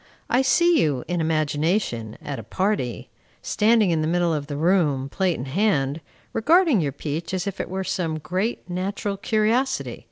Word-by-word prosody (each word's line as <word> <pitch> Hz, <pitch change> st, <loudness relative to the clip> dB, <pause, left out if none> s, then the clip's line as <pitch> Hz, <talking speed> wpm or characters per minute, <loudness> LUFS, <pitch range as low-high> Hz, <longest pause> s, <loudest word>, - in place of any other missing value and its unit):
I 250 Hz, -, +4 dB
see 340 Hz, +3 st, +4 dB
you, 140 Hz, -5 st, 0 dB
in 175 Hz, 0 st, -1 dB
imagination, 155 Hz, -, 0 dB
at 140 Hz, -3 st, -5 dB
a -, -, -7 dB
party, 155 Hz, -, -2 dB, 0.3 s
standing 215 Hz, -3 st, +3 dB
in 160 Hz, -2 st, +1 dB
the 155 Hz, -, 0 dB
middle 175 Hz, 0 st, +1 dB
of 145 Hz, -2 st, -3 dB
the 145 Hz, -2 st, -4 dB
room, 150 Hz, -5 st, +2 dB
plate 185 Hz, +1 st, 0 dB
in 125 Hz, -, -5 dB
hand, 150 Hz, -3 st, 0 dB, 0.3 s
regarding 315 Hz, -, +4 dB
your 145 Hz, -3 st, -1 dB
peach 155 Hz, +5 st, -4 dB
as 180 Hz, -, -2 dB
if 200 Hz, -1 st, -3 dB
it -, -, -6 dB
were 190 Hz, +1 st, -3 dB
some 165 Hz, -4 st, -2 dB
great 185 Hz, +8 st, -3 dB
natural 195 Hz, +3 st, -3 dB
curiosity. 225 Hz, +6 st, 0 dB
175 Hz, 170 wpm, -23 LUFS, 150-210 Hz, 0.3 s, I